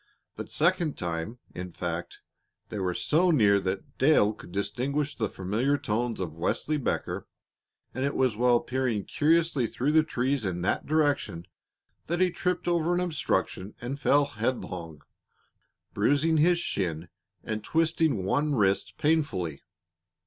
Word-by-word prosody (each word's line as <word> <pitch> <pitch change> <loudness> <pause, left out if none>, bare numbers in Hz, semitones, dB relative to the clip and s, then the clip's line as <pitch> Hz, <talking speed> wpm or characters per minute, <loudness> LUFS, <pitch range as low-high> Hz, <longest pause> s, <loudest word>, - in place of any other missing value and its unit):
The - - -6
second 170 -2 +1
time, 85 +6 -3 0.2
in 90 -1 -7
fact, 85 0 -5 0.5
these 105 - -4
were 90 -2 -1
so 175 +4 +2
near 105 -11 +5
that 95 0 -4
Dale 130 -7 +4
could 105 - -13
distinguish 130 - -2
the 110 -4 -1
familiar 115 +10 0
tones 115 0 -2
of 85 -5 -3
Wesley 120 - -1
Becker, 140 - -2 0.7
and 130 - -3
it 140 +1 -1
was 130 -4 +2
while 120 +1 +3
peering 125 -6 -1
curiously 155 -4 +2
through 135 +6 -1
the 160 +1 +6
trees 135 -3 -1
in 90 -3 -2
that - - 0
direction 145 - +1 0.6
that 175 +2 -1
he 185 -1 +3
tripped 180 +1 -2
over 170 0 +2
an - - +1
obstruction 125 - -1
and 130 +4 -5
fell 145 0 +4
headlong, 105 - -4 0.9
bruising 155 +3 +2
his 170 +3 +4
shin 85 - -2 0.4
and 110 -1 -4
twisting 160 - +1
one 145 +8 +1
wrist 100 -4 +1
painfully. 100 - 0
125 Hz, 140 wpm, -28 LUFS, 95-155 Hz, 0.9 s, the